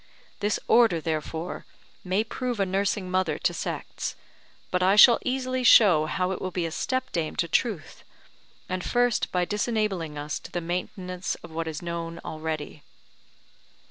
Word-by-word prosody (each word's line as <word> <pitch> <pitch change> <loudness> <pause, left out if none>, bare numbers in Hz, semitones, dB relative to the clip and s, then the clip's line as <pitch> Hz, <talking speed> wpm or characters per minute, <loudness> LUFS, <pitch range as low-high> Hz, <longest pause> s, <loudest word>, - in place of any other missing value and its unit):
This 205 +1 0
Order, 225 -8 +5
therefore, 160 +2 -4 0.4
may 190 +3 +1
prove 245 0 -4
a 195 - +3
nursing 190 0 -1
mother 185 -5 +1
to 175 -1 0
sects, - - -4 0.6
but 180 - +1
I 190 +2 +4
shall 230 +3 +8
easily 255 0 -1
show 180 -10 +7
how 185 +3 -1
it 190 - -4
will 185 - -2
be 180 -2 -2
a 165 - -3
step 260 +9 -2
dame 165 -3 -2
to 170 - 0
Truth: 190 -1 -1 0.6
and 185 0 -3
first 245 -2 +1
by 180 -1 +1
disenabling 205 -7 -1
us 145 0 -4
to - - -12
the 175 - -2
maintenance 180 +1 -4
of - - -10
what 165 0 -3
is 160 +1 -5
known 170 -1 -4
already. 155 -1 -5
180 Hz, 160 wpm, -26 LUFS, 165-210 Hz, 0.6 s, shall